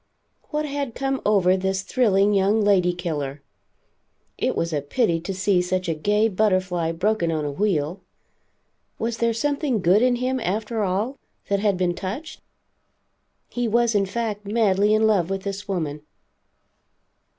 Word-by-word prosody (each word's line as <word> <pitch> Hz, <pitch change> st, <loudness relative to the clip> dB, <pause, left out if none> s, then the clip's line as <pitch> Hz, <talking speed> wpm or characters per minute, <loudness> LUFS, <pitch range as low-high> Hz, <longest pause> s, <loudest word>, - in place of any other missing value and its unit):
What 300 Hz, 0 st, -1 dB
had 280 Hz, -4 st, -4 dB
come 270 Hz, 0 st, -1 dB
over 190 Hz, -3 st, +4 dB
this 190 Hz, 0 st, -1 dB
thrilling 205 Hz, -4 st, +2 dB
young 200 Hz, +2 st, +3 dB
lady 195 Hz, -4 st, +3 dB
killer? 150 Hz, -6 st, -4 dB, 0.9 s
It -, -, -1 dB
was 165 Hz, -1 st, -1 dB
a 145 Hz, -, 0 dB
pity 170 Hz, -, 0 dB
to 175 Hz, +4 st, -5 dB
see 190 Hz, -1 st, +1 dB
such 185 Hz, 0 st, -2 dB
a 165 Hz, -, +1 dB
gay 205 Hz, +8 st, +2 dB
butterfly 185 Hz, -5 st, +1 dB
broken 175 Hz, 0 st, 0 dB
on 155 Hz, -2 st, -1 dB
a 145 Hz, -, -2 dB
wheel. 175 Hz, 0 st, -1 dB, 1.0 s
Was 230 Hz, 0 st, -2 dB
there 235 Hz, 0 st, +1 dB
something 280 Hz, 0 st, 0 dB
good 185 Hz, +4 st, +4 dB
in 250 Hz, 0 st, +3 dB
him, 255 Hz, +2 st, -1 dB
after 215 Hz, +2 st, -2 dB
all, 205 Hz, +8 st, -1 dB, 0.3 s
that 200 Hz, 0 st, +2 dB
had 200 Hz, -2 st, +1 dB
been 180 Hz, -1 st, +1 dB
touched? 265 Hz, -, -6 dB, 1.1 s
He 245 Hz, -1 st, -2 dB
was 235 Hz, +1 st, +2 dB
in 200 Hz, -2 st, +2 dB
fact 210 Hz, -1 st, -3 dB
madly 205 Hz, -2 st, +2 dB
in 220 Hz, 0 st, +3 dB
love 195 Hz, -6 st, +2 dB
with 195 Hz, 0 st, -3 dB
this 200 Hz, +1 st, -5 dB
woman. 155 Hz, -6 st, -3 dB
200 Hz, 155 wpm, -23 LUFS, 180-225 Hz, 1.1 s, over